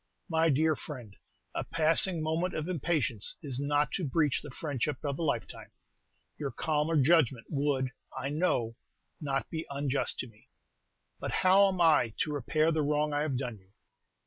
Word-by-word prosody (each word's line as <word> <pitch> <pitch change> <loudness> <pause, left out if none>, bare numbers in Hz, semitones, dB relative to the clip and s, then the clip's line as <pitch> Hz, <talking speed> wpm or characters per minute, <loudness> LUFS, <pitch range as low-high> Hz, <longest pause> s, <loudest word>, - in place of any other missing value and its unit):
"My 165 0 +3
dear 155 +2 +3
friend, 120 -11 -9 0.4
a - - -2
passing 165 +1 +2
moment 165 +4 -1
of 155 +1 -3
impatience 155 - 0
is 135 -4 -3
not 145 +1 +1
to 185 - -2
breach 150 -1 +1
the 150 - -9
friendship 145 0 -2
of 140 0 -2
a - - -2
lifetime. 120 - -2 0.7
Your 145 -2 -2
calmer 155 +2 0
judgment 135 -5 +3
would, 140 -3 0 0.3
I 130 +1 -2
know, 140 -8 0 0.4
not 135 -2 -2
be 160 -1 -4
unjust 140 -1 0
to 125 - -7
me." 110 -2 -21 0.7
"But - - -3
how 195 +2 +5
am 190 -2 -2
I 150 -9 +4
to 150 - 0
repair 155 +4 +1
the 160 -1 +1
wrong 150 0 +1
I 145 - +1
have 145 -4 -1
done 125 -5 -4
you?" 95 +1 -28
150 Hz, 170 wpm, -30 LUFS, 130-160 Hz, 0.7 s, how